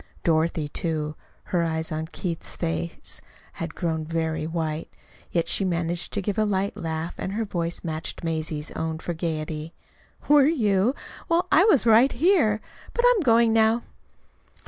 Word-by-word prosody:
Dorothy, 160 Hz, -1 st, +1 dB
too, 155 Hz, 0 st, -2 dB, 0.3 s
her 175 Hz, -, 0 dB
eyes 160 Hz, 0 st, -1 dB
on 155 Hz, 0 st, -3 dB
Keith's 170 Hz, 0 st, -5 dB
face, 80 Hz, 0 st, -3 dB, 0.4 s
had 165 Hz, -1 st, -4 dB
grown 160 Hz, -3 st, -1 dB
very 160 Hz, -1 st, -2 dB
white; 160 Hz, -1 st, -3 dB, 0.4 s
yet 170 Hz, -2 st, +1 dB
she -, -, +2 dB
managed 175 Hz, -1 st, -1 dB
to 205 Hz, -, -1 dB
give 205 Hz, +2 st, -1 dB
a -, -, +4 dB
light 200 Hz, -1 st, 0 dB
laugh, 160 Hz, +1 st, -3 dB
and 190 Hz, -, -3 dB
her 225 Hz, +2 st, -1 dB
voice 170 Hz, -4 st, -2 dB
matched 160 Hz, -1 st, -4 dB
Mazie's 160 Hz, -2 st, -2 dB
own 160 Hz, 0 st, -3 dB
for 175 Hz, +2 st, -4 dB
gayety. 155 Hz, -1 st, -4 dB, 0.5 s
"Were 290 Hz, -1 st, +6 dB
you? 225 Hz, -, +2 dB, 0.3 s
Well, 345 Hz, +2 st, +2 dB
I 350 Hz, +6 st, +6 dB
was 300 Hz, -, +5 dB
right 230 Hz, +4 st, +6 dB
here. 275 Hz, -, +3 dB, 0.3 s
But 480 Hz, -, +2 dB
I'm -, -, +4 dB
going 230 Hz, -4 st, +4 dB
now." 225 Hz, +1 st, +3 dB
170 Hz, 155 wpm, -25 LUFS, 160-220 Hz, 0.5 s, Were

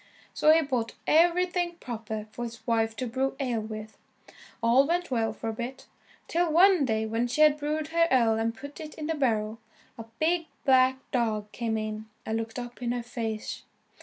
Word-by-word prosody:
So 310 Hz, -, +5 dB
he 320 Hz, +1 st, +5 dB
bought 250 Hz, -5 st, -2 dB
everything 350 Hz, +2 st, +3 dB
proper 220 Hz, -7 st, -5 dB
for 240 Hz, -, -6 dB
his 230 Hz, 0 st, -9 dB
wife 225 Hz, -1 st, +1 dB
to 255 Hz, -, -3 dB
brew 265 Hz, +3 st, -1 dB
ale 250 Hz, -4 st, 0 dB
with. 215 Hz, 0 st, -8 dB, 0.6 s
All 250 Hz, +4 st, +5 dB
went 350 Hz, -2 st, -1 dB
well 225 Hz, -3 st, +1 dB
for 225 Hz, -, -7 dB
a -, -, -3 dB
bit, 240 Hz, +4 st, -6 dB, 0.4 s
till 340 Hz, 0 st, +1 dB
one 355 Hz, -1 st, +6 dB
day 220 Hz, -2 st, 0 dB
when 225 Hz, +2 st, 0 dB
she 255 Hz, +5 st, 0 dB
had 305 Hz, -1 st, +7 dB
brewed 305 Hz, +1 st, -2 dB
her 335 Hz, +1 st, +3 dB
ale 235 Hz, -4 st, +4 dB
and 225 Hz, 0 st, -1 dB
put 285 Hz, +3 st, -9 dB
it 310 Hz, -1 st, -8 dB
in 310 Hz, -, -5 dB
the 325 Hz, -, 0 dB
barrel, 225 Hz, -6 st, 0 dB, 0.4 s
a 225 Hz, -, -6 dB
big 330 Hz, +1 st, +1 dB, 0.2 s
black 260 Hz, -1 st, +5 dB
dog 215 Hz, -4 st, 0 dB
came 230 Hz, -2 st, -2 dB
in 215 Hz, 0 st, -4 dB, 0.2 s
and 220 Hz, +1 st, -1 dB
looked 225 Hz, +1 st, -5 dB
up 245 Hz, 0 st, -7 dB
in 240 Hz, 0 st, 0 dB
her 245 Hz, -1 st, -3 dB
face. 225 Hz, -2 st, -4 dB
245 Hz, 195 wpm, -28 LUFS, 225-305 Hz, 0.6 s, had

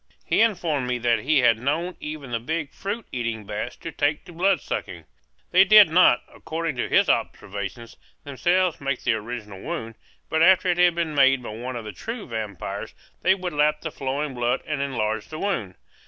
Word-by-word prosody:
He -, -, +2 dB
informed 170 Hz, -, +1 dB
me 125 Hz, 0 st, 0 dB
that 120 Hz, -1 st, +2 dB
he 145 Hz, -1 st, +2 dB
had 115 Hz, -2 st, +4 dB
known 160 Hz, +8 st, -1 dB
even 150 Hz, -4 st, -7 dB
the 115 Hz, -, -1 dB
big 150 Hz, +4 st, -3 dB
fruit 205 Hz, +3 st, -4 dB
eating 115 Hz, -4 st, -3 dB
bats 105 Hz, +1 st, -4 dB
to 165 Hz, -, -8 dB
take 150 Hz, 0 st, 0 dB
to 175 Hz, -, -12 dB
bloodsucking. 190 Hz, +4 st, -1 dB, 0.5 s
They 185 Hz, +1 st, +7 dB
did 210 Hz, -3 st, +8 dB
not, 175 Hz, -7 st, +5 dB
according 160 Hz, -2 st, -4 dB
to -, -, -2 dB
his -, -, +4 dB
observations, 100 Hz, +4 st, -3 dB, 0.3 s
themselves 175 Hz, +5 st, 0 dB
make 140 Hz, -2 st, -2 dB
the -, -, +2 dB
original 105 Hz, -3 st, -6 dB
wound; 155 Hz, -10 st, -5 dB, 0.3 s
but 160 Hz, -, 0 dB
after 185 Hz, +2 st, +5 dB
it 175 Hz, 0 st, +1 dB
had 175 Hz, -1 st, +5 dB
been 165 Hz, -2 st, -1 dB
made 135 Hz, -2 st, +4 dB
by -, -, -6 dB
one 120 Hz, +4 st, -6 dB
of 115 Hz, -2 st, -6 dB
the 105 Hz, -, -5 dB
true 225 Hz, -, -6 dB
vampires 110 Hz, -5 st, -5 dB, 0.3 s
they 190 Hz, +2 st, +4 dB
would 185 Hz, -3 st, -5 dB
lap 150 Hz, +1 st, +2 dB
the 160 Hz, -, -4 dB
flowing 140 Hz, +1 st, -3 dB
blood 120 Hz, -1 st, -1 dB
and 150 Hz, -2 st, -2 dB
enlarge 110 Hz, -6 st, -2 dB
the 155 Hz, -, -7 dB
wound. 120 Hz, -, -2 dB
145 Hz, 190 wpm, -24 LUFS, 120-170 Hz, 0.5 s, did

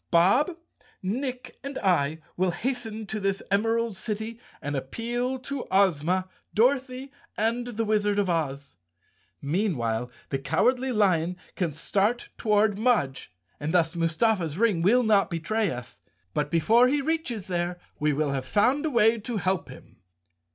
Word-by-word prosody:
Bob, 245 Hz, -, +4 dB, 0.5 s
Nick 250 Hz, +4 st, -3 dB
and 275 Hz, 0 st, -5 dB
I 160 Hz, -4 st, +1 dB
will 185 Hz, +1 st, +1 dB
hasten 225 Hz, +1 st, -3 dB
to 215 Hz, +1 st, -4 dB
this 195 Hz, -1 st, -1 dB
Emerald 225 Hz, +2 st, +1 dB
City 220 Hz, +2 st, -4 dB, 0.2 s
and 145 Hz, 0 st, -3 dB
appeal 240 Hz, -, -2 dB
to 265 Hz, +1 st, -5 dB
Ozma, 185 Hz, -1 st, +2 dB, 0.3 s
Dorothy 260 Hz, +3 st, +1 dB, 0.3 s
and 235 Hz, +3 st, 0 dB
the 225 Hz, -1 st, -2 dB
Wizard 210 Hz, -1 st, +1 dB
of 200 Hz, -2 st, +2 dB
Oz. 140 Hz, -, -2 dB, 0.7 s
Meanwhile 135 Hz, -, 0 dB, 0.2 s
the 135 Hz, -, -1 dB
Cowardly 250 Hz, -, +1 dB
Lion 180 Hz, -6 st, +2 dB, 0.2 s
can 170 Hz, -6 st, -1 dB
start 210 Hz, +9 st, 0 dB
toward 210 Hz, -2 st, +2 dB
Mudge 220 Hz, -, +1 dB, 0.3 s
and 155 Hz, +4 st, -2 dB
thus 170 Hz, 0 st, +2 dB
Mustafa's 165 Hz, 0 st, +1 dB
ring 210 Hz, -6 st, +2 dB
will 235 Hz, +8 st, +4 dB
not 210 Hz, -3 st, +3 dB
betray 200 Hz, +6 st, 0 dB
us. 125 Hz, -3 st, -7 dB, 0.3 s
But 150 Hz, -1 st, 0 dB
before 220 Hz, +11 st, +4 dB
he 290 Hz, +3 st, +2 dB
reaches 285 Hz, -, -1 dB
there 175 Hz, -1 st, -2 dB, 0.2 s
we 150 Hz, 0 st, +2 dB
will 145 Hz, 0 st, 0 dB
have 135 Hz, -1 st, -3 dB
found 260 Hz, -, +2 dB
a -, -, 0 dB
way 230 Hz, -3 st, +4 dB
to 230 Hz, +1 st, -4 dB
help 190 Hz, -2 st, -1 dB
him." -, -, -13 dB
205 Hz, 145 wpm, -26 LUFS, 165-235 Hz, 0.7 s, Bob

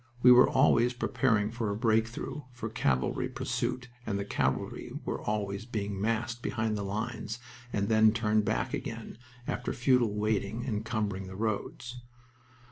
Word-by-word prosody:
We 125 Hz, -, +9 dB
were 125 Hz, +1 st, +8 dB
always 120 Hz, +1 st, +4 dB
preparing 115 Hz, -4 st, +1 dB
for 115 Hz, -2 st, -2 dB
a 100 Hz, -, -1 dB
"break 110 Hz, 0 st, +3 dB
through" 120 Hz, +5 st, -6 dB
for 115 Hz, -3 st, -5 dB
cavalry 70 Hz, -, 0 dB
pursuit, 125 Hz, 0 st, -2 dB, 0.2 s
and 105 Hz, -4 st, -2 dB
the 100 Hz, -, -2 dB
cavalry -, -, -1 dB
were -, -, -2 dB
always 105 Hz, -1 st, -2 dB
being 100 Hz, -4 st, -3 dB
massed 115 Hz, +2 st, -1 dB
behind 110 Hz, -2 st, -1 dB
the 105 Hz, -, -2 dB
lines 110 Hz, +2 st, -3 dB, 0.3 s
and 100 Hz, -1 st, 0 dB
then 110 Hz, 0 st, +6 dB
turned 110 Hz, -1 st, +2 dB
back 105 Hz, +2 st, -1 dB
again, 115 Hz, -3 st, -5 dB, 0.3 s
after 125 Hz, -, -2 dB
futile 120 Hz, -4 st, +3 dB
waiting, 110 Hz, +2 st, -1 dB
encumbering 105 Hz, -4 st, -2 dB
the 95 Hz, -, -8 dB
roads. 115 Hz, +3 st, -3 dB
110 Hz, 150 wpm, -30 LUFS, 105-120 Hz, 0.3 s, We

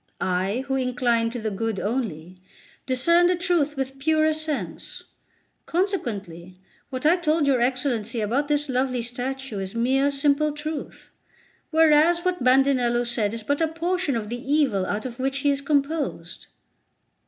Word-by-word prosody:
I, 190 Hz, +7 st, -1 dB
who 270 Hz, -, -1 dB
incline 245 Hz, -3 st, +1 dB
to 240 Hz, -, -6 dB
the 220 Hz, -2 st, -3 dB
good 220 Hz, 0 st, -2 dB
only, 185 Hz, -7 st, -3 dB, 0.5 s
discern 335 Hz, +7 st, +4 dB
the 360 Hz, -, +2 dB
truth 340 Hz, -5 st, 0 dB
with 270 Hz, 0 st, -4 dB
purer 310 Hz, +2 st, +2 dB
sense. 310 Hz, -1 st, -5 dB, 0.6 s
Consequently, 200 Hz, -, -3 dB, 0.3 s
what 255 Hz, +1 st, -5 dB
I 335 Hz, +4 st, +5 dB
told 315 Hz, -3 st, +1 dB
your 265 Hz, -3 st, +2 dB
Excellency 245 Hz, -3 st, 0 dB
about 240 Hz, +7 st, 0 dB
this 295 Hz, 0 st, 0 dB
lovely 255 Hz, -2 st, 0 dB
statue 250 Hz, -1 st, -4 dB
is 190 Hz, +2 st, -5 dB
mere 265 Hz, +4 st, +2 dB
simple 285 Hz, +1 st, +1 dB
truth; 300 Hz, 0 st, -7 dB, 0.6 s
whereas 325 Hz, +2 st, +4 dB
what 360 Hz, -6 st, 0 dB
Bandinello 255 Hz, -2 st, +3 dB
said 230 Hz, -4 st, 0 dB
is 225 Hz, -, -5 dB
but 285 Hz, +7 st, -1 dB
a 325 Hz, -, +3 dB
portion 330 Hz, -2 st, -1 dB
of 215 Hz, -2 st, -3 dB
the 240 Hz, +1 st, -5 dB
evil 255 Hz, -11 st, +2 dB
out 210 Hz, +3 st, -3 dB
of 245 Hz, 0 st, -7 dB
which 270 Hz, +1 st, -1 dB
he 285 Hz, -, +3 dB
is 280 Hz, 0 st, -1 dB
composed." 290 Hz, +2 st, -2 dB
270 Hz, 155 wpm, -24 LUFS, 235-305 Hz, 0.6 s, I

